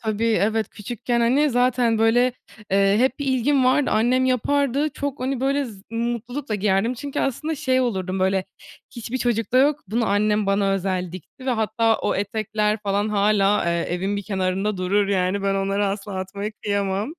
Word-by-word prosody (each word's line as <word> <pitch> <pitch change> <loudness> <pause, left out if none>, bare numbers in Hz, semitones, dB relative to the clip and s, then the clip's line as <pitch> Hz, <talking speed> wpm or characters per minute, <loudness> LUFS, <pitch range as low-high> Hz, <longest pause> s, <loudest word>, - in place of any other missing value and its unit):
Tabii, 220 0 -2 0.2
evet, 215 +1 0
küçükken, 235 +3 -3
hani, 275 +6 +3
zaten, 245 -2 +2
böyle, 245 +3 +3 0.4
eee, 195 +1 +3
hep 260 +1 +1
bir 285 - -3
ilgim 265 +1 +2
vardı, 260 +2 +3
annem 245 +4 +2
yapardı, 280 +3 +1
çok, 285 -3 -4
hani, 260 0 -2
böyle, 275 +1 +1
z 205 -6 -10
mutlulukla 235 +2 -3
giyerdim. 205 +3 +1
Çünkü 280 +3 -4
aslında 305 +5 -2
şey 260 -4 +1
olurdum, 190 -6 -2
böyle, 190 0 +1 0.5
"Hiçbir 240 +1 -5
çocukta 240 0 +1
yok, 290 +2 +3
bunu 230 +3 0
annem 210 +1 +1
bana 195 0 +2
özel 185 -2 -2
dikti." 185 - -11
Ve - - +2
hatta 225 -1 +1
o - - -1
etekler 215 +1 -1
falan 205 +1 0
hâlâ, 205 -1 +2
eee, 170 - +1 0.2
evin 190 +3 -2
bir 200 - -3
kenarında 195 +1 -1
durur. 195 +2 +1
Yani, 195 0 0
ben 195 0 +1
onları 195 +1 0
asla 200 0 -4
atmaya 200 +3 -4
kıyamam. 200 +1 -1
215 Hz, 170 wpm, -23 LUFS, 195-250 Hz, 0.5 s, hani